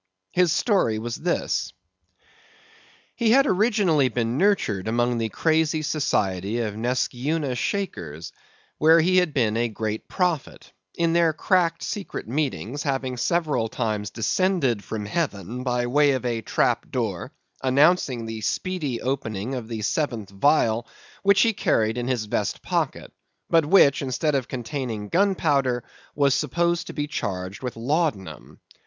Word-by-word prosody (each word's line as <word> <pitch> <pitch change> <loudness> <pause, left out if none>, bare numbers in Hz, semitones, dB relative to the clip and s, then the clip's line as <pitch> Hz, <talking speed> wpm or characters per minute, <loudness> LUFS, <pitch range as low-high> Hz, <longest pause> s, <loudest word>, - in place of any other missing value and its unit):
His 180 -2 +3
story 185 - +2
was 115 +2 -4
this: 175 +2 -1 1.4
He 235 -2 +1
had 270 +5 +6
been 275 - +1
originally 190 - +2
nurtured 120 - 0
among 120 +1 +1
the 115 -1 -1
crazy 160 +3 +1
society 105 - 0
of 105 -3 -3
Neskyeuna 130 +5 -1
Shakers, 85 - -4 0.5
where 160 +2 +6
he 185 +3 +3
had 180 -3 +3
been 115 -7 +1
a 120 +1 +1
great 110 0 -4
prophet; 175 -7 -2 0.2
in 170 -1 +1
their 170 -2 +3
cracked, 170 0 +1
secret 205 - -5
meetings 140 0 -2
having 135 -3 -2
several 150 -3 0
times 110 -3 -2
descended 135 - 0
from 105 +1 -5
heaven 115 - -3
by 125 -1 0
the 120 - -2
way 145 0 +4
of 130 -1 -3
a 115 -2 -1
trap - - 0
door, - - -3 0.3
announcing 135 -2 +3
the 110 -1 -6
speedy 145 - -2
opening 125 -3 -3
of 125 -4 -4
the 110 -2 -5
seventh 115 -5 -2
vial, 115 0 +2 0.3
which 200 -1 +4
he 230 -1 +3
carried 110 - +1
in 120 - -3
his 125 -4 -1
vest 105 -1 -2
pocket; - - -2 0.4
but, 165 -3 +4
which, 150 -6 +5
instead 140 +3 -1
of 135 -2 0
containing 120 -4 -4
gunpowder, 145 - +1 0.3
was 140 -2 +3
supposed 170 +2 0
to - - -7
be 145 - -2
charged 95 - -4
with 125 -2 -4
laudanum. 130 - -2
130 Hz, 145 wpm, -24 LUFS, 115-165 Hz, 1.4 s, had